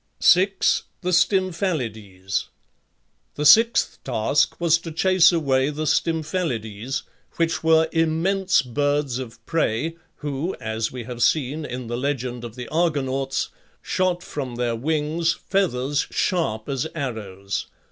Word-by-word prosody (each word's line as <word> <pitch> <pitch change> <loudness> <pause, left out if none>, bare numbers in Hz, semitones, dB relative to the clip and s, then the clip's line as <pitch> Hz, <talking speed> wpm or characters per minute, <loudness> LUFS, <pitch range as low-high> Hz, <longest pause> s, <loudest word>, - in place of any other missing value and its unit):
6. 190 +2 +4 0.2
THE 180 -1 -1
STYMPHALIDES. 155 - 0 0.9
The 150 - -2
sixth 230 +8 +5
task 125 +3 +1
was 170 -1 +3
to 165 -1 -7
chase 185 +2 +5
away 140 -5 +2
the 150 +1 -3
Stymphalides, 145 - -1 0.3
which 165 -1 0
were 160 0 +5
immense 175 +4 +2
birds 145 0 0
of 115 -3 -9
prey 160 0 0 0.2
who, 145 +4 -3
as 110 0 -2
we 125 -2 -6
have 120 0 -7
seen 150 +3 +1
(in 125 -2 -5
the 120 +1 -3
legend 125 -3 -2
of 120 -1 -8
the 125 -1 -7
Argonauts), 135 -5 0 0.3
shot 180 -1 0
from 130 -5 -5
their 120 -1 -1
wings 155 +5 0
feathers 145 -8 0
sharp 110 -12 -1
as 135 +1 -1
arrows. 105 - -4
145 Hz, 125 wpm, -23 LUFS, 120-165 Hz, 0.9 s, sixth